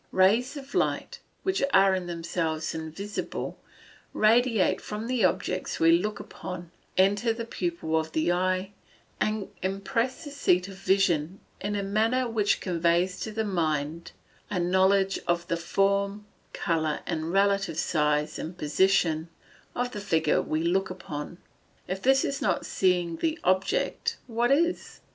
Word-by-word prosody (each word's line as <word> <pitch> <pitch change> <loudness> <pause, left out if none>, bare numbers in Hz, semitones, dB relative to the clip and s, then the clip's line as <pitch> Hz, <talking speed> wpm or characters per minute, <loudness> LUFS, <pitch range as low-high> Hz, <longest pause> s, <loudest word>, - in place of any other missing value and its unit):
Rays 220 +9 +3
of 275 -1 -10
light, - - -1 0.2
which 380 0 0
are 195 0 +6
in 185 -2 -2
themselves 165 -2 -2
invisible, 160 +6 -5 0.5
radiate 225 -1 +3
from 210 +1 -5
the 245 -2 0
objects 185 0 0
we 165 0 +5
look 205 +5 +1
upon, 175 -2 -8 0.3
enter 205 +5 +3
the 230 0 -5
pupil 170 -6 -2
of 160 0 0
the 160 +2 +2
eye, 185 +2 0 0.5
and 215 -2 -1
impress 230 +7 -1
the 290 - -8
seat 180 -10 +2
of 195 - -9
vision 190 -3 +1 0.2
in 205 +1 -2
a 200 - -1
manner 225 +6 +1
which 215 -3 +1
conveys 175 +1 +1
to 220 - -4
the 220 +1 -2
mind 160 -3 -1 0.4
a 200 - -1
knowledge 190 +2 +3
of 175 0 0
the 170 - +2
form, 200 +3 0 0.3
colour, 160 -3 -1
and 160 +1 -2
relative 195 -3 +2
size 150 -2 +1
and 170 +3 -6
position 165 0 +2 0.5
of 245 0 -1
the 205 - -5
figure 160 -5 +2
we 155 +1 -2
look 190 +3 +1
upon. 170 -3 -6 0.5
If 190 +1 -3
this 270 +3 +4
is 280 - -3
not - - 0
seeing 175 -3 +1
the 325 0 0
object 190 - +1
what 240 0 0
is? 335 +6 +1
190 Hz, 145 wpm, -27 LUFS, 170-210 Hz, 0.5 s, are